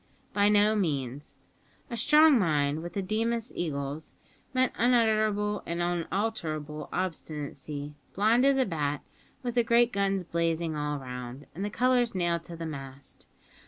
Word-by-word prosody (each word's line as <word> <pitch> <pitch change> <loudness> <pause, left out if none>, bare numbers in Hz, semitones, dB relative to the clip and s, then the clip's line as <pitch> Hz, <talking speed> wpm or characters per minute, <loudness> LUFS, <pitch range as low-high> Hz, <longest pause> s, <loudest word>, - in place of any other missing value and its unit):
By 205 0 +4
no 210 +1 +4
means. 145 - -2 0.5
A - - -2
strong 300 +3 +6
mind 150 -4 +1
with 175 0 -7
the 195 - -2
Deemas 225 +4 -1
eagles 145 -2 -4 0.4
meant 255 -1 +2
unutterable 215 -4 +2
and 170 +1 -2
unalterable 170 -4 -2
obstinacy, 150 -4 -4 0.2
blind 220 +5 +4
as 275 0 +4
a 260 - +3
bat, 150 -5 -2 0.4
with 245 -1 -2
the 240 0 +3
great 235 +1 +3
guns 195 -1 +1
blazing 165 -1 -1
all 150 0 -2
round, 125 0 -7
and 185 - -5
the 205 - -1
colours 245 0 +2
nailed 170 -2 0
to 170 - -8
the 165 0 -6
mast. 135 -3 -8
175 Hz, 145 wpm, -28 LUFS, 150-220 Hz, 0.5 s, strong